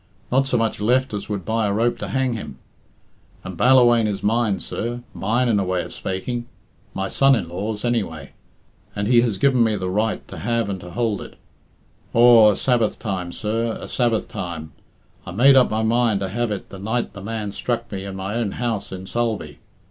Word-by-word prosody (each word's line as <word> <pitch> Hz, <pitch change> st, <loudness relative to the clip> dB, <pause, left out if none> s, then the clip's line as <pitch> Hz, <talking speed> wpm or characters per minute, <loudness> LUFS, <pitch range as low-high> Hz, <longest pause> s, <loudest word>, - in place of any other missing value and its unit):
Not 135 Hz, +2 st, +3 dB
so 125 Hz, -, +1 dB
much 115 Hz, -2 st, -1 dB
left 125 Hz, +3 st, +2 dB
as 105 Hz, +1 st, -5 dB
would 100 Hz, -4 st, -3 dB
buy 110 Hz, -1 st, 0 dB
a -, -, 0 dB
rope 115 Hz, +3 st, +1 dB
to -, -, -4 dB
hang 130 Hz, -2 st, 0 dB
him. 110 Hz, -, -7 dB, 0.9 s
And 95 Hz, -1 st, -7 dB
Ballawhaine 120 Hz, 0 st, +5 dB
is 100 Hz, -2 st, -3 dB
mine, 110 Hz, -2 st, +1 dB
sir; 120 Hz, +1 st, -4 dB
mine 120 Hz, +6 st, 0 dB
in 110 Hz, -4 st, +2 dB
a -, -, +1 dB
way 90 Hz, -1 st, -1 dB
of -, -, -9 dB
spak 95 Hz, 0 st, -5 dB
ing 120 Hz, -1 st, -3 dB, 0.5 s
my 95 Hz, 0 st, -1 dB
son 135 Hz, +4 st, +4 dB
in 100 Hz, -, -3 dB
law's, 105 Hz, +5 st, -4 dB
anyway 90 Hz, -, -2 dB, 0.6 s
and 100 Hz, 0 st, -1 dB
he 120 Hz, 0 st, +5 dB
has 115 Hz, -5 st, 0 dB
given 130 Hz, 0 st, +3 dB
me 110 Hz, -2 st, +1 dB
the 95 Hz, -2 st, -3 dB
right 110 Hz, +3 st, -1 dB
to -, -, -8 dB
have 115 Hz, +3 st, -1 dB
and 95 Hz, -2 st, -4 dB
to 90 Hz, -, -9 dB
hould 110 Hz, -1 st, -1 dB
it. -, -, -10 dB, 0.8 s
Aw, 115 Hz, -2 st, +8 dB
a -, -, -5 dB
Sabbath 120 Hz, -4 st, +1 dB
time, 95 Hz, -5 st, -4 dB
sir; 110 Hz, +4 st, -2 dB
a -, -, -7 dB
Sabbath 120 Hz, -3 st, 0 dB
time. 85 Hz, -7 st, -6 dB, 0.5 s
I -, -, -9 dB
made 125 Hz, +10 st, +5 dB
up 130 Hz, -2 st, +5 dB
my 110 Hz, +1 st, -1 dB
mind 115 Hz, -2 st, +2 dB
to 95 Hz, -, -2 dB
have 120 Hz, +4 st, -1 dB
it 105 Hz, -2 st, -5 dB
the 95 Hz, -, -9 dB
night 110 Hz, +4 st, -2 dB
the 100 Hz, -, -9 dB
man 105 Hz, 0 st, -4 dB
struck 120 Hz, +3 st, -3 dB
me 95 Hz, -2 st, -4 dB
in 100 Hz, -1 st, -6 dB
my 95 Hz, +1 st, -4 dB
own 115 Hz, -4 st, -1 dB
house 115 Hz, -4 st, -3 dB
in 95 Hz, 0 st, -7 dB
Sulby. 115 Hz, +1 st, -3 dB
110 Hz, 210 wpm, -22 LUFS, 100-120 Hz, 0.9 s, Aw